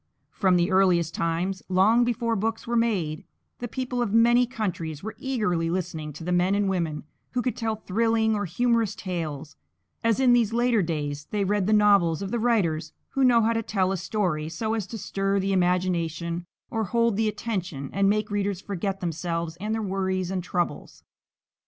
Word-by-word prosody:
From 190 -2 +2
the 175 +2 +2
earliest 180 -4 +3
times, 175 +3 -1
long 205 +6 +4
before 235 -1 0
books 225 +2 -2
were 235 - -2
made, 190 -10 0 0.4
the 245 - -4
people 250 0 -3
of 235 - -1
many 240 +2 +5
countries 180 - -4
were 220 - -5
eagerly 210 -11 0
listening 160 -4 -3
to 165 - -9
the 180 - -2
men 180 +2 +2
and 205 -1 +1
women 170 -5 -1 0.3
who 250 -1 0
could 250 - -1
tell 225 -1 -1
thrilling 220 +2 +1
or 205 -1 -1
humorous 230 +3 +1
tales, 155 -5 -5 0.5
as 230 0 +2
in 255 -2 +5
these 230 -3 +3
later 240 -2 +3
days 150 -3 -3
they 210 -1 0
read 200 0 +1
the - - +2
novels 200 -5 +4
of 195 - -5
the 240 - 0
writers 170 -10 +1 0.2
who 270 - 0
know 240 -3 +5
how 230 +1 +2
to 225 - 0
tell 190 -4 0
a 195 - -1
story 170 -5 -1
so 220 +7 -2
as 215 -4 -2
to 225 - -6
stir 195 0 -1
the 195 +1 0
imagination 175 -2 0 0.3
or 225 -1 -1
hold 230 +1 +1
the 220 +1 +1
attention 190 - -4
and 195 0 +3
make 210 0 0
readers 200 -2 -1
forget 195 0 -3
themselves 170 -1 -3
and 210 +4 -2
their 220 - -2
worries 190 -2 -1
and 185 -2 -2
troubles. 175 -4 -3
195 Hz, 190 wpm, -26 LUFS, 175-225 Hz, 0.5 s, many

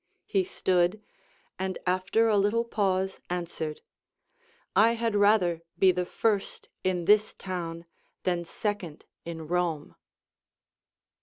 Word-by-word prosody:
He 390 - +1
stood, 185 - +1 0.6
and 190 -1 -2
after 185 +5 +2
a 215 - +3
little 205 +3 +2
pause 190 -4 0
answered, 170 -3 -4 0.9
I 230 +1 +6
had 230 -2 -1
rather 200 -5 +3 0.2
be 190 -1 +6
the 180 0 -2
first 210 -2 -1
in 180 -2 0
this 210 +2 +4
town 170 -3 -5 0.4
than 175 -2 0
second 180 -3 -4 0.2
in 165 -2 -6
Kome. 170 -3 -1
185 Hz, 110 wpm, -28 LUFS, 175-210 Hz, 0.9 s, I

